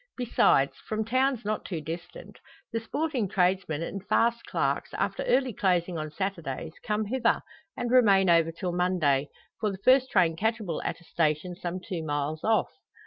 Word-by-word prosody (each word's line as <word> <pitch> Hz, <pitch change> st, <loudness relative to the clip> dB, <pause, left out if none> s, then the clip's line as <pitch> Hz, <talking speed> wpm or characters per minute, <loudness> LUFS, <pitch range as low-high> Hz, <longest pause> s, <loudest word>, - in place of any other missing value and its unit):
Besides, 230 Hz, -, +3 dB
from 220 Hz, 0 st, -1 dB
towns 255 Hz, 0 st, +1 dB
not 215 Hz, 0 st, -1 dB
too 175 Hz, -4 st, -4 dB
distant, 170 Hz, +3 st, -8 dB, 0.3 s
the 230 Hz, -, 0 dB
sporting 265 Hz, -1 st, -2 dB
tradesmen 180 Hz, -4 st, +1 dB
and 195 Hz, +3 st, -5 dB
fast 235 Hz, 0 st, +2 dB
clerks, -, -, -1 dB
after -, -, -1 dB
early 270 Hz, -, +2 dB
closing 180 Hz, -3 st, 0 dB
on 155 Hz, 0 st, -4 dB
Saturdays, 165 Hz, -4 st, -4 dB
come 215 Hz, 0 st, -1 dB
hither, 235 Hz, +2 st, +1 dB, 0.3 s
and 240 Hz, -1 st, -2 dB
remain 200 Hz, -7 st, +5 dB
over 165 Hz, -1 st, +4 dB
till 175 Hz, +2 st, -4 dB
Monday, 170 Hz, -6 st, +1 dB, 0.3 s
for 215 Hz, -, 0 dB
the 195 Hz, -, -5 dB
first 260 Hz, 0 st, +5 dB
train 175 Hz, -6 st, +3 dB
catchable 215 Hz, -2 st, -1 dB
at -, -, -3 dB
a -, -, -17 dB
station 165 Hz, +1 st, -1 dB
some 180 Hz, 0 st, -4 dB
two 180 Hz, -1 st, -5 dB
miles 145 Hz, +1 st, -2 dB
off. 220 Hz, 0 st, +2 dB
185 Hz, 165 wpm, -28 LUFS, 165-225 Hz, 0.3 s, remain